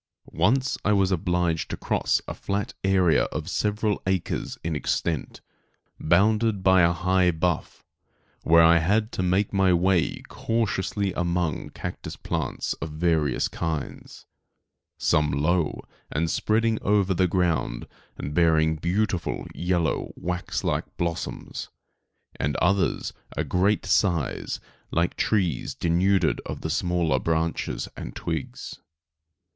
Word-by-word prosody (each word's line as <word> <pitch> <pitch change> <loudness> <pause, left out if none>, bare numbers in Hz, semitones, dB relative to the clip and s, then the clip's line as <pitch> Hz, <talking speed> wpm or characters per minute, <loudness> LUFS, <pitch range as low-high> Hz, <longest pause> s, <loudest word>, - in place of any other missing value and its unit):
Once 125 +11 +1
I 105 - +3
was 100 -1 +2
obliged 90 -2 0
to - - -4
cross - - 0
a - - -4
flat 100 +1 -3
area 95 -5 +3
of 75 +1 -5
several 105 0 0
acres 95 -2 -1
in 80 -1 -2
extent, 75 0 -2 0.6
bounded 105 +4 +2
by 95 -1 +6
a 85 0 +5
high 90 +1 +2
bluff, 85 -1 -2 0.6
where 85 0 +6
I 85 +1 +6
had 105 +6 +1
to - - -3
make 95 +3 +1
my 95 -2 +4
way 90 0 +1
cautiously 100 -3 -1
among 85 -3 -1
cactus - - -6
plants - - -3
of 80 - -3
various 80 -5 +1
kinds; 80 -3 -5 0.7
some 75 0 +2
low 80 +4 0 0.3
and 80 +3 0
spreading 110 +1 +1
over 100 -2 +2
the 95 0 +2
ground 85 -9 0 0.3
and 70 - -5
bearing 80 -1 +3
beautiful, 90 +2 -1
yellow, 85 -2 -1
wax 90 0 -3
like - - -2
blossoms, 85 -1 -4 0.7
and 75 +1 -1
others 90 +1 +1 0.2
a - - +1
great 100 +4 +1
size, 95 -6 0 0.3
like 85 +1 0
trees 90 - 0
denuded 90 +3 +2
of - - -6
the - - -2
smaller 85 -6 +1
branches 80 +3 -1
and - - -7
twigs. 80 -4 -5
90 Hz, 125 wpm, -25 LUFS, 80-95 Hz, 0.7 s, by